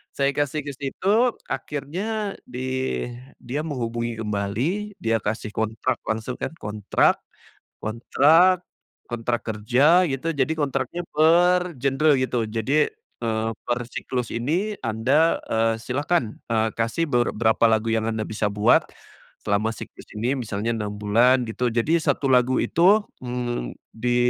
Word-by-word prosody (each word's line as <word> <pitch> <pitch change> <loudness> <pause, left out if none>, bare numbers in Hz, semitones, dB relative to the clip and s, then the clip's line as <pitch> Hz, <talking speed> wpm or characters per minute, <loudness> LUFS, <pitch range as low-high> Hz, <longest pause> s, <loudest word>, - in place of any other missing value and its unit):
saya 140 0 +2
kasih 145 +1 -1
ke 140 - -2
situ 140 +7 -5 0.4
akhirnya 195 +9 -3
di 125 0 -8 0.8
dia 135 +5 -4
menghubungi 120 -5 -3
kembali, 120 - -2
dia 115 0 +1
kasih 110 0 -3
kontrak 110 +3 -1
langsung 110 +3 -2
kan. - - -2
Kontrak 105 - +1 0.7
kontrak 160 +11 +4 0.5
kontrak 120 0 -2
kerja 130 - +3
gitu, 140 +3 -2
jadi 145 0 0
kontraknya 145 +3 -2
per 175 +3 +4
genre 140 +3 +3
gitu. 125 -3 0
Jadi, 115 +8 +1 0.3
eee, 110 -1 -1 0.2
per 120 0 +1
siklus 125 -2 -3
ini 175 - -1
anda, 130 +8 +2 0.2
eee, 115 0 +2
silakan, 135 -3 -1
eee, 110 -1 +1
kasih 115 +8 0
ber 120 -1 +1
berapa 110 +1 +3
lagu 110 0 +1
yang 110 0 0
anda 110 -1 -1
bisa 105 -1 -2
buat 105 +1 +3 0.6
selama 105 +2 0
siklus - - -11
ini, 115 +4 0
misalnya 110 -1 -2
6 105 -2 -3
bulan 115 +5 +3
gitu. 125 +3 -1
Jadi 145 +9 +2
1 140 -3 0
lagu 125 0 +4
itu, 195 +6 +4 0.2
mmm, 120 - -3 0.2
di 120 +2 -1
125 Hz, 135 wpm, -24 LUFS, 110-150 Hz, 0.8 s, kontrak